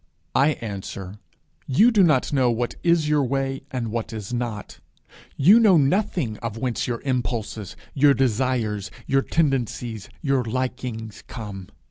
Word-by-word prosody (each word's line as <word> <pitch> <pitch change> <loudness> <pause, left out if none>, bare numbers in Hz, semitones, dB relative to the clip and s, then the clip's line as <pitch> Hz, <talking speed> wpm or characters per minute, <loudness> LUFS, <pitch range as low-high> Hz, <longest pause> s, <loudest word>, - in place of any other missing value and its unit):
I 145 +3 +4
answer, 100 -2 -6 0.5
You 210 - +5
do 210 -4 +4
not 150 -6 +3
know 130 -3 +3
what 120 +1 -1
is 170 -3 +3
your 150 -1 +3
way 135 +1 -1
and 125 -5 -3
what 115 0 -3
is 110 0 -6
not. 120 -4 -4 0.6
You 190 +11 +7
know 205 -6 +6
nothing 145 - +1
of 115 -2 -5
whence 125 0 -2
your 120 -2 -3
impulses, 115 -6 -3 0.2
your 140 0 +5
desires, 120 -5 0 0.2
your 135 0 +2
tendencies, 125 - -1
your 135 -3 +2
likings 120 -2 -4
come. 100 -5 -7
125 Hz, 140 wpm, -24 LUFS, 110-140 Hz, 0.6 s, You